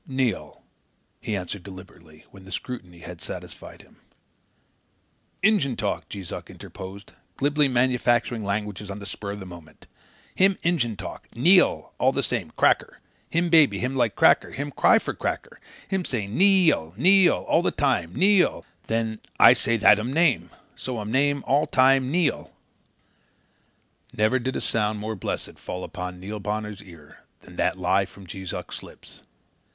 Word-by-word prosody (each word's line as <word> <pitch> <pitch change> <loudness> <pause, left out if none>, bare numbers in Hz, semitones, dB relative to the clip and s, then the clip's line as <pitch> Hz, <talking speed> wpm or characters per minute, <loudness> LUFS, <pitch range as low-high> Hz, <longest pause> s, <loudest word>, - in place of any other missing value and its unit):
"Neil," 130 -6 -2 0.6
he 110 - -3
answered 95 +1 -5
deliberately 90 -4 -14
when 95 - -14
the 95 - -13
scrutiny 90 -5 -7
had 85 -1 -10
satisfied - - -9
him. - - -24 1.5
"Injun 195 - +3
talk," 105 -2 -3
Jees 95 -4 -7
Uck - - -7
interposed, 95 +2 -10 0.2
glibly 145 +1 +2
manufacturing 120 -2 +1
languages 105 0 -3
on 100 - -5
the 100 - -9
spur 100 +1 -6
of 105 - -8
the 95 - -8
moment. 85 -3 -13 0.5
"Him 190 0 +3
Injun 140 -10 0
talk, 95 -1 -8
NEE 175 +11 +6
AL - - -2
all 130 - +4
the 140 +1 -1
same 110 -10 -2
'cracker.' - - +2 0.3
Him 170 +1 0
baby, 160 -4 +5
him 125 +2 -2
like 120 -5 +1
cracker; - - +4
him 145 +1 -4
cry - - +4
for - - -3
cracker. - - -5 0.3
Him 190 -1 -1
say, 120 - -3
'NEE 185 - +4
AL, 80 - -4
NEE 185 - +6
AL,' - - -1
all 165 - +2
time 130 -12 +1
him 85 - -16
say, - - -5
'NEE 200 0 +6
AL.' - - -4 0.2
Then 110 -1 -1 0.2
I - - +9
say 115 0 0
that 105 -1 +6
um 115 +4 -3
name. 160 -2 +2 0.3
So 130 -2 -5
um 105 0 -5
name 140 +2 +1
all 145 +3 +2
time 130 0 +4
Nee 165 0 +2
al." - - -12 1.6
Never 110 +5 +1
did 130 +1 -3
sound 110 -1 0
more 110 +1 -4
blessed 95 - -5
fall 90 0 -6
upon 90 -2 -6
Neil 105 +3 -6
Bonner's 105 0 -4
ear 85 -7 -16 0.2
than - - -15
that - - 0
lie 95 +1 +1
from 100 - -15
Jees 95 +1 -7
Uck's - - -6
lips. - - -15
110 Hz, 170 wpm, -24 LUFS, 95-135 Hz, 1.6 s, I